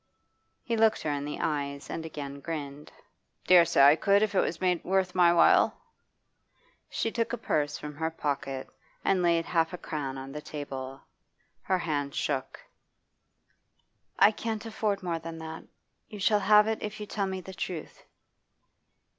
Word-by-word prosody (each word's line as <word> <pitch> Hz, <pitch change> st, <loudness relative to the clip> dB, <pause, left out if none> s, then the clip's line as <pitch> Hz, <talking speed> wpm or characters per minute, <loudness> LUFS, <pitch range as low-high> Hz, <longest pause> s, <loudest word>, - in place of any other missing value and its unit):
He 235 Hz, -, -1 dB
looked 220 Hz, -1 st, +3 dB
her 150 Hz, -, -1 dB
in 145 Hz, 0 st, -2 dB
the 150 Hz, -, -4 dB
eyes 140 Hz, -1 st, -2 dB
and 165 Hz, -, -5 dB
again 140 Hz, -3 st, -7 dB
grinned. 145 Hz, -2 st, -6 dB, 0.5 s
'Dare 180 Hz, -2 st, +7 dB
say 140 Hz, -, +4 dB
I 145 Hz, +2 st, +8 dB
could 200 Hz, +4 st, +3 dB
if 215 Hz, -, 0 dB
it 195 Hz, -, +3 dB
was 165 Hz, -, -2 dB
made 180 Hz, -2 st, +1 dB
worth 190 Hz, -1 st, +1 dB
my 175 Hz, -2 st, +5 dB
while.' 170 Hz, -1 st, +4 dB, 1.1 s
She 225 Hz, -, -2 dB
took 230 Hz, 0 st, -1 dB
a -, -, -1 dB
purse 150 Hz, -9 st, -1 dB
from 150 Hz, 0 st, -7 dB
her 160 Hz, +1 st, -1 dB
pocket 140 Hz, -4 st, -3 dB, 0.4 s
and 190 Hz, -2 st, +3 dB
laid 170 Hz, -1 st, +2 dB
half 165 Hz, 0 st, +1 dB
a -, -, -4 dB
crown 140 Hz, -5 st, -4 dB
on 135 Hz, +1 st, -7 dB
the 150 Hz, +2 st, -6 dB
table. 135 Hz, -3 st, -7 dB, 0.6 s
Her 190 Hz, -, +1 dB
hand 145 Hz, -5 st, -2 dB
shook. 135 Hz, -3 st, -2 dB, 1.6 s
'I 205 Hz, -, +7 dB
can't 220 Hz, 0 st, -4 dB
afford 215 Hz, -3 st, -2 dB
more 170 Hz, -2 st, -2 dB
than 165 Hz, 0 st, -7 dB
that. 160 Hz, 0 st, -8 dB, 0.4 s
You 210 Hz, -, -8 dB
shall 205 Hz, +2 st, +3 dB
have 210 Hz, +1 st, +6 dB
it 220 Hz, 0 st, -2 dB
if 210 Hz, 0 st, -5 dB
you 210 Hz, -, -5 dB
tell 200 Hz, -1 st, -2 dB
me 190 Hz, 0 st, -3 dB
the 190 Hz, +1 st, -10 dB
truth. 170 Hz, -2 st, -6 dB
165 Hz, 170 wpm, -28 LUFS, 145-195 Hz, 1.6 s, I